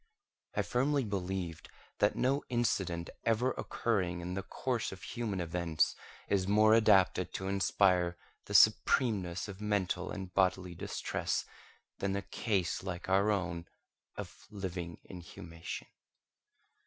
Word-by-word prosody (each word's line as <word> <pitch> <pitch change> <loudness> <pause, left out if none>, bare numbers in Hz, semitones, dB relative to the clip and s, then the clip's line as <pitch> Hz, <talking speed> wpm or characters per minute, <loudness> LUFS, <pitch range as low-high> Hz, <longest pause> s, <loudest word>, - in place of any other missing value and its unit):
I - - +2
firmly 140 +3 +1
believed 95 -5 -3 0.3
that 105 - +3
no 135 +3 +1
incident 95 -8 0
ever 115 +3 +2
occurring 95 -10 -1
in 90 +1 -4
the 95 - -2
course 120 +4 -2
of 95 - -10
human 110 -5 -3
events 85 -2 0 0.3
is 95 -2 +1
more 110 +2 +5
adapted 95 -5 +4
to 95 - -3
inspire 90 -3 +2 0.3
the - - -4
supremeness 95 -8 +4
of 100 0 -8
mental 95 -3 0
and 95 -3 -6
bodily 95 -1 +2
distress 85 - -2 0.5
than 100 0 0
a 100 - -2
case 95 -4 -1
like 90 -1 -5
our 100 +2 +4
own, 90 -4 -1 0.5
of - - -8
living 90 -4 -5
inhumation. 85 -2 -8
95 Hz, 125 wpm, -33 LUFS, 90-105 Hz, 0.5 s, more